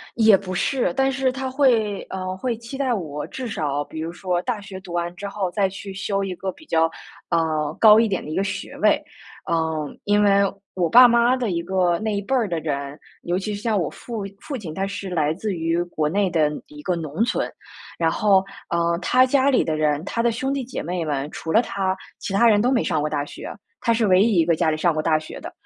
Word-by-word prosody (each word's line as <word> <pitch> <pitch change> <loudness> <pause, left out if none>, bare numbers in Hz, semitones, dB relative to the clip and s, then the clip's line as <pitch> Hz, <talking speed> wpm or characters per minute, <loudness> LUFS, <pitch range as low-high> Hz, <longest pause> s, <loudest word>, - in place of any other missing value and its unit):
也 220 -3 +6
不 185 -1 -6
是， 215 +1 0
但 270 +4 +2
是 265 -1 +1
他 265 0 -4
会 235 -7 +2
呃， 185 0 -4
会 245 +3 -2
期 235 +4 -8
待 265 -3 +1
我 150 -8 -4
至 260 -2 -6
少， 145 -9 -2
比 155 +2 -7
如 165 +1 -4
说 180 0 -1
大 240 -4 -2
学 195 -1 -8
读 185 -2 -10
完 175 0 -2
之 200 +2 -6
后 200 -2 -2
再 195 +2 +1
去 195 +1 -8
修 195 +1 -2
一 190 -2 -3
个 190 +2 -4
比 315 - -18
较 165 0 +3 0.4
呃， 155 -2 0
高 215 -1 +8
一 230 - +3
点 190 -3 -2
的 - - -8
一 155 - -4
个 195 - +1
学 195 -1 -5
位。 - - +3 0.5
嗯， 160 -3 -1
因 205 0 +3
为 200 -1 +5 0.3
我 180 -2 +1
爸 245 +8 +9
妈 235 +1 +4
的 250 -4 -2
一 170 -2 -1
个 180 -1 +1
那 215 -1 -1
一 200 - -1
辈 260 +7 -1
儿 240 -4 +2
的 170 -3 -2
人， 140 -2 -4 0.2
尤 175 +1 0
其 210 +2 -3
是 205 - -7
像 225 -2 +1
我 160 - -1
父 230 -4 -6 0.2
父 285 - -6
亲， 175 -11 -6
他 195 - -1
是 200 0 -5
来 155 -4 +1
自 195 +3 -3
于 165 +1 0
国 160 -3 -2
内 195 +4 +1
的 155 -3 +2 0.2
一 150 0 -12
个 180 - 0
农 160 +4 -2
村。 250 - -1 0.5
然 165 -1 +2
后， 195 -2 +3 0.2
呃， 170 0 +1
他 255 +7 +4
家 270 +1 +3
里 265 - +3
的 160 - -1
人， 155 +1 0
他 230 - -1
的 235 0 +2
兄 265 +4 -2
弟 275 -2 -2
姐 250 - -5
妹 175 +1 -2
们， 145 -3 -2
除 160 - -5
了 225 +6 +4
他， 195 -3 -2 0.2
其 - - -5
他 200 +5 +4
人 210 -2 +5
都 245 +4 +2
没 250 - +2
上 155 - 0
过 150 - -1
大 145 -1 -2
学， - - -8 0.3
他 235 - +2
是 230 -1 +2
唯 185 -2 +5
一 220 0 +3
一 165 - +4
个 170 0 +3
家 160 - +1
里 155 - 0
上 170 +1 +2
过 155 - -1
大 155 0 +2
学 155 0 -8
的。 - - -7
190 Hz, 265 characters per minute, -23 LUFS, 165-225 Hz, 0.5 s, 爸